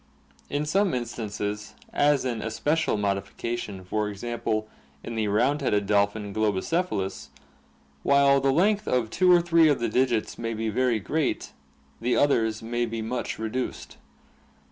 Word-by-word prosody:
In 145 Hz, +1 st, -1 dB
some 190 Hz, +1 st, +2 dB
instances, 105 Hz, -3 st, -4 dB, 0.2 s
as 145 Hz, -2 st, +3 dB
an 120 Hz, -4 st, -2 dB
especial 145 Hz, +5 st, 0 dB
modification, 100 Hz, 0 st, -3 dB
for 105 Hz, +3 st, -1 dB
example, 110 Hz, 0 st, -3 dB, 0.4 s
in 115 Hz, -, -6 dB
the 110 Hz, -2 st, -1 dB
round 120 Hz, +8 st, +2 dB
beaded 105 Hz, -7 st, +1 dB
dolphin, 100 Hz, 0 st, +1 dB
Globicephalus 105 Hz, -, 0 dB
(see -, -, -11 dB
Fig. -, -, -31 dB
ig,C), -, -, -24 dB, 0.6 s
while 140 Hz, -, +4 dB
the 135 Hz, 0 st, +3 dB
length 205 Hz, +8 st, +2 dB
of 120 Hz, -3 st, 0 dB
two 185 Hz, -1 st, +4 dB
or 175 Hz, -1 st, +7 dB
three 165 Hz, -2 st, +5 dB
of 145 Hz, -, +3 dB
the 115 Hz, -1 st, 0 dB
digits 120 Hz, -2 st, 0 dB
may 115 Hz, -1 st, -3 dB
be 110 Hz, 0 st, -2 dB
very 120 Hz, 0 st, +1 dB
great, 145 Hz, +9 st, -1 dB, 0.5 s
the 120 Hz, +2 st, +1 dB
others 115 Hz, -6 st, +2 dB
may 120 Hz, +1 st, -1 dB
be 115 Hz, 0 st, -4 dB
much 120 Hz, +2 st, -3 dB
reduced. 110 Hz, +3 st, -4 dB
115 Hz, 155 wpm, -26 LUFS, 105-140 Hz, 0.6 s, or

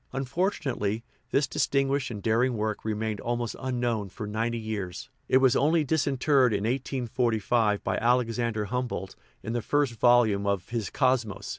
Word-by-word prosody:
Unfortunately, 130 Hz, -, -1 dB, 0.3 s
this 140 Hz, +3 st, +2 dB
distinguished 135 Hz, +1 st, 0 dB
and 105 Hz, -4 st, -7 dB
daring 115 Hz, +2 st, +2 dB
work 105 Hz, 0 st, -2 dB
remained 110 Hz, -1 st, -2 dB
almost 120 Hz, -1 st, -2 dB
unknown 120 Hz, -5 st, -1 dB
for 105 Hz, +3 st, -7 dB
ninety 115 Hz, +3 st, -2 dB
years; 105 Hz, -1 st, -5 dB, 0.2 s
it 130 Hz, -, +6 dB
was 130 Hz, -2 st, +4 dB
only 155 Hz, +2 st, +3 dB
disinterred 140 Hz, -3 st, +2 dB
in 100 Hz, 0 st, -1 dB
1845 120 Hz, -3 st, 0 dB
by -, -, -1 dB
Alexander 115 Hz, -2 st, +1 dB
Humboldt 120 Hz, -4 st, -3 dB, 0.3 s
in 115 Hz, -, -4 dB
the 120 Hz, -, -1 dB
first 145 Hz, 0 st, +1 dB
volume 110 Hz, -3 st, +3 dB
of 100 Hz, -2 st, -1 dB
his 115 Hz, -4 st, -2 dB
Cosmos. 125 Hz, -6 st, 0 dB
120 Hz, 145 wpm, -27 LUFS, 110-130 Hz, 0.3 s, it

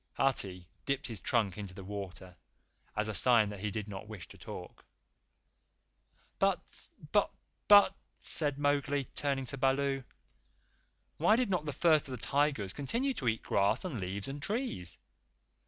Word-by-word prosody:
Hathi 95 Hz, -10 st, 0 dB, 0.2 s
dipped 140 Hz, +1 st, -1 dB
his 115 Hz, -6 st, -5 dB
trunk 105 Hz, -5 st, 0 dB
into 100 Hz, -3 st, -7 dB
the 95 Hz, -, -8 dB
water 95 Hz, -2 st, -7 dB, 0.6 s
as 105 Hz, 0 st, 0 dB
a 110 Hz, -, -2 dB
sign 115 Hz, -1 st, +6 dB
that 105 Hz, -1 st, -7 dB
he 105 Hz, +2 st, -2 dB
did 105 Hz, 0 st, -4 dB
not 100 Hz, 0 st, -7 dB
wish 105 Hz, -5 st, -9 dB
to -, -, -12 dB
talk. -, -, -9 dB, 1.6 s
"But -, -, -1 dB, 0.2 s
but -, -, +3 dB, 0.4 s
but," 205 Hz, -1 st, +8 dB, 0.2 s
said 145 Hz, -3 st, +2 dB
Mowgli, 145 Hz, -1 st, +1 dB
turning 135 Hz, +1 st, -1 dB
to 135 Hz, +1 st, -5 dB
Baloo, 135 Hz, 0 st, +1 dB, 1.1 s
"why 175 Hz, +8 st, +4 dB
did 240 Hz, -4 st, 0 dB
not 175 Hz, -4 st, 0 dB
the 145 Hz, -, -2 dB
First 155 Hz, 0 st, +3 dB
of 130 Hz, -, -6 dB
the -, -, -4 dB
Tigers 140 Hz, -9 st, +1 dB
continue 235 Hz, -, -1 dB
to 145 Hz, -, -4 dB
eat 110 Hz, -1 st, 0 dB
grass 100 Hz, -, +1 dB
and 150 Hz, -11 st, -3 dB
leaves 95 Hz, +2 st, -3 dB
and 140 Hz, +1 st, -6 dB
trees? 200 Hz, -, -2 dB
130 Hz, 155 wpm, -32 LUFS, 100-145 Hz, 1.6 s, but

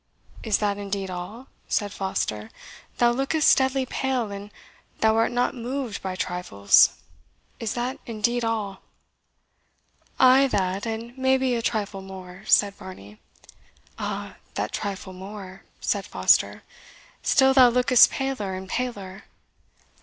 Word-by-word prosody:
"Is 220 Hz, -3 st, +1 dB
that 205 Hz, -1 st, -1 dB
indeed 195 Hz, -1 st, -4 dB
all?" 185 Hz, +8 st, -7 dB, 0.2 s
said 205 Hz, -1 st, -1 dB
Foster; 110 Hz, -, -3 dB, 0.5 s
"thou 240 Hz, 0 st, +4 dB
lookest 275 Hz, +5 st, +3 dB
deadly 265 Hz, 0 st, +1 dB
pale, 255 Hz, -4 st, -2 dB
and 200 Hz, +1 st, -7 dB, 0.5 s
thou 220 Hz, 0 st, +3 dB
art 225 Hz, +2 st, +2 dB
not 245 Hz, +2 st, +1 dB
moved 250 Hz, -2 st, -4 dB
by 190 Hz, -1 st, -4 dB
trifles 180 Hz, -, +3 dB, 0.6 s
is 225 Hz, -3 st, -3 dB
that 245 Hz, +2 st, -3 dB
indeed 235 Hz, +2 st, -1 dB
all?" 215 Hz, -4 st, -2 dB, 1.4 s
"Ay, 260 Hz, +1 st, +6 dB
that 195 Hz, -2 st, -1 dB
and 225 Hz, +2 st, -5 dB
maybe 265 Hz, -1 st, +2 dB
a 235 Hz, -, -1 dB
trifle 210 Hz, -4 st, -2 dB
more," 190 Hz, -1 st, -10 dB
said 200 Hz, -1 st, +4 dB
Varney. 145 Hz, -, -12 dB, 0.8 s
"Ah, -, -, -5 dB, 0.2 s
that 105 Hz, +2 st, -2 dB
trifle 195 Hz, -1 st, -5 dB
more!" 190 Hz, 0 st, -10 dB
said -, -, -1 dB
Foster; -, -, +2 dB, 0.6 s
"still 265 Hz, -1 st, +4 dB
thou 255 Hz, -2 st, +7 dB
lookest 250 Hz, +1 st, +6 dB
paler 260 Hz, -8 st, -3 dB
and 190 Hz, 0 st, -8 dB
paler." 205 Hz, -6 st, -4 dB
215 Hz, 125 wpm, -25 LUFS, 190-250 Hz, 1.4 s, thou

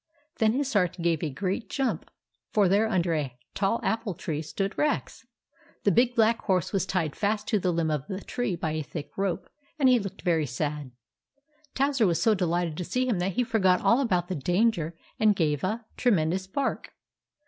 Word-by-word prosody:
Then 220 Hz, -1 st, +4 dB
his 270 Hz, +1 st, -1 dB
heart 180 Hz, -4 st, +2 dB
gave 170 Hz, -2 st, +1 dB
a 160 Hz, -, -1 dB
great 190 Hz, -, -3 dB
jump, 270 Hz, -2 st, -2 dB, 0.4 s
for 205 Hz, -3 st, +4 dB
there 205 Hz, +4 st, +3 dB
under 175 Hz, -5 st, +1 dB
a 140 Hz, -6 st, -2 dB, 0.2 s
tall 200 Hz, +4 st, +1 dB
apple 220 Hz, -4 st, -1 dB
tree 155 Hz, -1 st, -3 dB
stood 195 Hz, +6 st, -3 dB
Rex! 300 Hz, -, -1 dB, 0.6 s
The 200 Hz, -, +4 dB
big 240 Hz, +5 st, +3 dB
black 230 Hz, 0 st, +4 dB
horse 185 Hz, -3 st, 0 dB
was 190 Hz, -1 st, 0 dB
tied 165 Hz, -6 st, -1 dB
fast 210 Hz, 0 st, -1 dB
to 215 Hz, -, +3 dB
a 185 Hz, -, +2 dB
limb 165 Hz, -2 st, 0 dB
of 150 Hz, -2 st, -2 dB
the 190 Hz, -1 st, -4 dB
tree 245 Hz, -5 st, -2 dB
by 160 Hz, -2 st, -2 dB
a 155 Hz, 0 st, -2 dB
thick 150 Hz, 0 st, -7 dB
rope, 195 Hz, -3 st, -2 dB, 0.3 s
and 275 Hz, -4 st, +4 dB
he 250 Hz, -1 st, +5 dB
looked 195 Hz, -3 st, -7 dB
very 165 Hz, -4 st, +2 dB
sad. 145 Hz, +2 st, -3 dB, 0.9 s
Towser 270 Hz, -5 st, +2 dB
was 170 Hz, -2 st, +1 dB
so 225 Hz, -, +4 dB
delighted 175 Hz, -4 st, 0 dB
to 180 Hz, -, -2 dB
see 255 Hz, +8 st, -1 dB
him 220 Hz, -8 st, +1 dB
that 185 Hz, +2 st, -1 dB
he 250 Hz, -, +1 dB
forgot 190 Hz, -6 st, +2 dB
all 235 Hz, +4 st, +4 dB
about 180 Hz, -9 st, +1 dB
the 185 Hz, -, -3 dB
danger, 175 Hz, -, +1 dB, 0.2 s
and 215 Hz, -2 st, +4 dB
gave 150 Hz, -5 st, 0 dB
a 220 Hz, +5 st, -2 dB
tremendous 190 Hz, -5 st, +1 dB
bark. 270 Hz, +8 st, -2 dB
190 Hz, 195 wpm, -27 LUFS, 165-225 Hz, 0.9 s, he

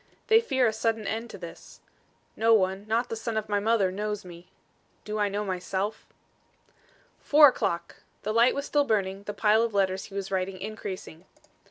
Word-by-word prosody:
"They 445 Hz, 0 st, +7 dB
fear 265 Hz, -, +1 dB
a 220 Hz, -, +2 dB
sudden 220 Hz, 0 st, -1 dB
end 225 Hz, +3 st, -3 dB
to -, -, -9 dB
this. 170 Hz, -3 st, -11 dB, 0.6 s
No 225 Hz, 0 st, +4 dB
one, 190 Hz, 0 st, 0 dB
not 230 Hz, +3 st, 0 dB
the -, -, -3 dB
son 225 Hz, 0 st, -3 dB
of 215 Hz, 0 st, -2 dB
my 205 Hz, -1 st, +1 dB
mother 205 Hz, -3 st, +2 dB
knows 210 Hz, +1 st, -4 dB
me. 175 Hz, 0 st, -12 dB, 0.6 s
Do 215 Hz, 0 st, -3 dB
I 205 Hz, -1 st, +2 dB
know 205 Hz, +1 st, -2 dB
myself?" 190 Hz, +2 st, -3 dB, 1.1 s
Four 295 Hz, 0 st, +7 dB
o'clock! 170 Hz, -8 st, -3 dB, 0.3 s
The 215 Hz, -, -2 dB
light 235 Hz, +2 st, +4 dB
was 280 Hz, 0 st, -3 dB
still 290 Hz, 0 st, +2 dB
burning, 200 Hz, -6 st, -1 dB
the 205 Hz, -, -4 dB
pile 215 Hz, +1 st, +4 dB
of 230 Hz, -2 st, -1 dB
letters 190 Hz, -1 st, +1 dB
he 200 Hz, -, -12 dB
was 195 Hz, -1 st, -4 dB
writing 185 Hz, 0 st, -2 dB
increasing. 190 Hz, -5 st, -7 dB
210 Hz, 185 wpm, -27 LUFS, 190-225 Hz, 1.1 s, They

